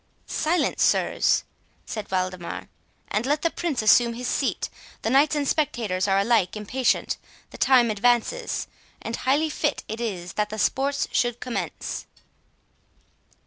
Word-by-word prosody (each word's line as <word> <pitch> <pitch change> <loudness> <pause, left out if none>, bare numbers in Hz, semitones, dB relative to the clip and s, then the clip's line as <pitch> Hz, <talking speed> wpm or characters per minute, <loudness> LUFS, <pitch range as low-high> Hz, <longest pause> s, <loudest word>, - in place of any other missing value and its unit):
"Silence, 340 +3 0
sirs," - - +3 0.4
said 215 -2 -5
Waldemar, 185 -2 -3 0.4
"and 210 - 0
let 295 +2 +1
the 335 - +2
Prince 300 -10 -2
assume 235 +2 +5
his 250 +1 -4
seat. - - 0 0.4
The 225 - 0
knights 285 +3 +4
and 290 -1 0
spectators 220 -12 0
are 195 0 +3
alike 200 -2 +2
impatient, 245 +5 0 0.3
the - - -11
time 245 -4 +5
advances, 240 - +1 0.3
and 230 - -4
highly 290 +6 +1
fit 295 0 -1
it 220 +2 -5
is 185 -6 -4
that 210 0 0
the 215 - -5
sports 275 +6 +1
should 240 -1 +1
commence." 250 -2 -4
240 Hz, 140 wpm, -25 LUFS, 210-280 Hz, 0.4 s, assume